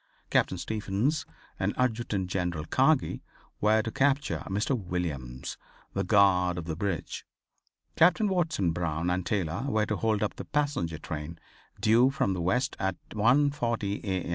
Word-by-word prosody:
Captain 95 Hz, -, +2 dB
Stephens 110 Hz, -, -1 dB, 0.3 s
and -, -, 0 dB
Adjutant 115 Hz, -6 st, 0 dB
General 90 Hz, -4 st, -2 dB
Kagi -, -, +2 dB, 0.4 s
were 110 Hz, +1 st, +3 dB
to 115 Hz, -, -4 dB
capture 140 Hz, +2 st, +1 dB
Mr. 105 Hz, +7 st, 0 dB
Williams, 85 Hz, -, -4 dB, 0.4 s
the -, -, 0 dB
guard 90 Hz, -3 st, +4 dB
of 85 Hz, -, -4 dB
the 80 Hz, -2 st, -3 dB
bridge. 90 Hz, -2 st, -3 dB, 0.7 s
Captain 180 Hz, +5 st, +4 dB
Watson 160 Hz, -, +1 dB
Brown 85 Hz, 0 st, -1 dB
and 90 Hz, +1 st, 0 dB
Taylor 95 Hz, +2 st, -1 dB
were 110 Hz, -4 st, +2 dB
to 105 Hz, -1 st, -2 dB
hold 110 Hz, -2 st, +1 dB
up 105 Hz, -, -2 dB
the -, -, -6 dB
passenger 145 Hz, -, -1 dB
train 80 Hz, +1 st, -6 dB, 0.4 s
due 115 Hz, +4 st, +5 dB
from 135 Hz, -8 st, 0 dB
the 90 Hz, -, -3 dB
west 125 Hz, -, 0 dB
at 95 Hz, -1 st, 0 dB, 0.2 s
1:40 115 Hz, -3 st, +1 dB
A. 95 Hz, -4 st, -2 dB
100 Hz, 145 wpm, -28 LUFS, 90-125 Hz, 0.7 s, due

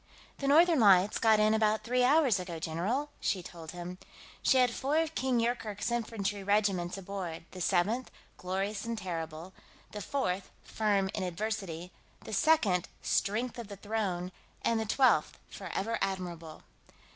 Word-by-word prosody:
"The 275 Hz, -, -2 dB
Northern 325 Hz, +2 st, +6 dB
Lights 195 Hz, -2 st, +5 dB
got 220 Hz, -2 st, +5 dB
in 215 Hz, 0 st, +4 dB
about 220 Hz, 0 st, +2 dB
three 250 Hz, +1 st, +1 dB
hours 265 Hz, -6 st, +4 dB
ago, 180 Hz, -2 st, -5 dB
general," 195 Hz, -, -2 dB
she 185 Hz, -3 st, -1 dB
told 165 Hz, -2 st, -10 dB
him. 180 Hz, +1 st, -7 dB, 0.4 s
"She 265 Hz, -, +4 dB
had 250 Hz, -2 st, +4 dB
four 280 Hz, +6 st, -1 dB
of 320 Hz, -1 st, +1 dB
King 260 Hz, -4 st, +1 dB
Yoorkerk's 230 Hz, -2 st, -1 dB
infantry 210 Hz, -4 st, -2 dB
regiments 195 Hz, -3 st, +1 dB
aboard 190 Hz, -4 st, -5 dB
the 185 Hz, -, -8 dB
Seventh, 205 Hz, +8 st, +1 dB, 0.3 s
Glorious 195 Hz, +3 st, -3 dB
and 230 Hz, 0 st, -3 dB
Terrible, 165 Hz, -2 st, -5 dB, 0.4 s
the 210 Hz, -, -6 dB
Fourth, 195 Hz, -8 st, -2 dB
Firm 200 Hz, -3 st, 0 dB
in 205 Hz, -, -3 dB
Adversity, 180 Hz, -2 st, -3 dB, 0.3 s
the -, -, -7 dB
Second, 200 Hz, -, +3 dB
Strength 230 Hz, +4 st, 0 dB
of 230 Hz, -, -6 dB
the 200 Hz, -1 st, -9 dB
Throne, 195 Hz, -4 st, -2 dB, 0.3 s
and 230 Hz, -1 st, +2 dB
the 220 Hz, -, -1 dB
Twelfth, 230 Hz, -, +3 dB
Forever 195 Hz, +4 st, -3 dB
Admirable. 170 Hz, -4 st, -4 dB
205 Hz, 150 wpm, -31 LUFS, 180-230 Hz, 0.4 s, Northern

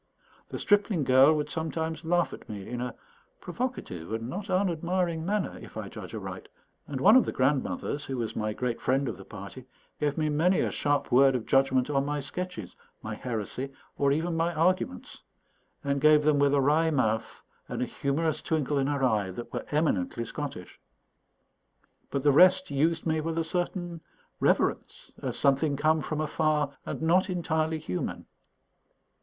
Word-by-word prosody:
The -, -, -5 dB
stripling 205 Hz, -5 st, +2 dB
girl 130 Hz, +3 st, +6 dB
would 150 Hz, -1 st, -1 dB
sometimes 160 Hz, 0 st, -3 dB
laugh 175 Hz, +1 st, +1 dB
at -, -, -11 dB
me 100 Hz, -3 st, -7 dB
in 120 Hz, 0 st, -4 dB
a 125 Hz, 0 st, -4 dB, 0.4 s
provocative 170 Hz, -, -5 dB
and 115 Hz, +1 st, -3 dB
not 195 Hz, +9 st, -5 dB
unadmiring 175 Hz, -2 st, 0 dB
manner, 200 Hz, +1 st, -1 dB
if -, -, -11 dB
I -, -, -5 dB
judge -, -, -8 dB
aright; -, -, -7 dB, 0.4 s
and 140 Hz, -3 st, -4 dB
one 210 Hz, -, +7 dB
of 260 Hz, -, +7 dB
the -, -, -3 dB
grandmothers, 140 Hz, +2 st, 0 dB
who 135 Hz, -, -4 dB
was 115 Hz, -2 st, -3 dB
my 110 Hz, 0 st, -1 dB
great 120 Hz, +2 st, -3 dB
friend 135 Hz, +2 st, +1 dB
of 115 Hz, -, -3 dB
the 95 Hz, -, -11 dB
party, 105 Hz, +6 st, -10 dB, 0.3 s
gave 145 Hz, 0 st, 0 dB
me 155 Hz, -1 st, +1 dB
many 160 Hz, +5 st, +2 dB
a -, -, 0 dB
sharp 145 Hz, 0 st, 0 dB
word 135 Hz, +1 st, +6 dB
of 120 Hz, -, -2 dB
judgment 135 Hz, -1 st, +3 dB
on 140 Hz, -2 st, +1 dB
my 145 Hz, +1 st, -2 dB
sketches, 145 Hz, -, -6 dB, 0.3 s
my 110 Hz, -, -4 dB
heresy, 125 Hz, +4 st, -4 dB, 0.2 s
or 140 Hz, -1 st, +2 dB
even 165 Hz, +4 st, 0 dB
my 165 Hz, +1 st, +1 dB
arguments, 170 Hz, -, 0 dB, 0.6 s
and 140 Hz, -1 st, 0 dB
gave 155 Hz, 0 st, +6 dB
them 150 Hz, -1 st, +3 dB
with 140 Hz, 0 st, +4 dB
a 140 Hz, -, +3 dB
wry 155 Hz, +4 st, +3 dB
mouth 110 Hz, -7 st, -1 dB, 0.3 s
and -, -, -2 dB
a -, -, 0 dB
humorous 150 Hz, +5 st, -1 dB
twinkle 150 Hz, -3 st, 0 dB
in 135 Hz, -, +1 dB
her 145 Hz, -2 st, -1 dB
eye 105 Hz, -6 st, +2 dB
that 120 Hz, +6 st, -8 dB
were -, -, -4 dB
eminently 115 Hz, -, 0 dB
Scottish. 135 Hz, -6 st, -7 dB, 1.3 s
But 140 Hz, -1 st, -2 dB
the 145 Hz, -, +5 dB
rest 185 Hz, +4 st, +5 dB
used 160 Hz, +4 st, +1 dB
me 160 Hz, -1 st, +1 dB
with 165 Hz, +1 st, -3 dB
a 165 Hz, -, +2 dB
certain 175 Hz, 0 st, -3 dB, 0.4 s
reverence, -, -, 0 dB
as -, -, -3 dB
something 140 Hz, +1 st, +2 dB
come 155 Hz, +2 st, +2 dB
from 155 Hz, 0 st, -3 dB
afar 155 Hz, -2 st, 0 dB
and -, -, -4 dB
not 180 Hz, +4 st, +3 dB
entirely 160 Hz, -3 st, 0 dB
human. 90 Hz, -, -4 dB
150 Hz, 175 wpm, -28 LUFS, 130-165 Hz, 1.3 s, one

